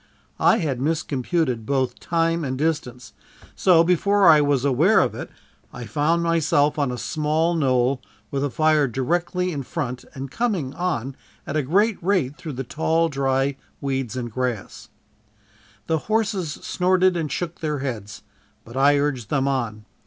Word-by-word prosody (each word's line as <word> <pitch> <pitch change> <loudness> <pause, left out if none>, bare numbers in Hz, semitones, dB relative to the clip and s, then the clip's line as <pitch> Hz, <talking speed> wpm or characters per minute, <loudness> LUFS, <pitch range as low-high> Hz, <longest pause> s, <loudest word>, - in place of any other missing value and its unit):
I - - +5
had 135 -7 -2
miscomputed 145 -4 -1
both 130 -2 0
time 165 -1 0
and 130 -2 -3
distance, 140 -5 -2 0.4
so 170 -3 +5
before 195 +4 +3
I 155 -1 +8
was 145 -2 +1
aware 155 - +4
of - - +1
it, - - -7 0.4
I 125 -1 -8
found 150 +9 +1
myself 155 -3 +2
on 140 -3 +1
a 125 - -4
small 155 +4 0
knoll, 130 -4 +1 0.3
with 140 - -1
the 145 - 0
fire 155 0 +3
directly 175 - -1
in 145 -4 -3
front 130 -2 -4
and 135 0 -6
coming 195 - -1
on 150 -7 -2 0.3
at 145 - -4
a 155 - +2
great 200 - +1
rate 170 -7 +1
through 155 -1 -7
the 135 +1 -4
tall 160 +5 0
dry 135 -1 0 0.2
weeds 130 -3 -3
and 120 -2 -4
grasses. 125 -3 -4 1.0
The 160 -1 0
horses 205 -5 -1
snorted 185 +4 +1
and 160 -4 -2
shook 175 -1 -4
their 150 -2 -2
heads, 110 -6 -5 0.4
but 115 - -12
I 140 +2 +4
urged 135 -6 -1
them 140 -2 +1
on. 115 -6 -2
145 Hz, 160 wpm, -23 LUFS, 130-165 Hz, 1.0 s, I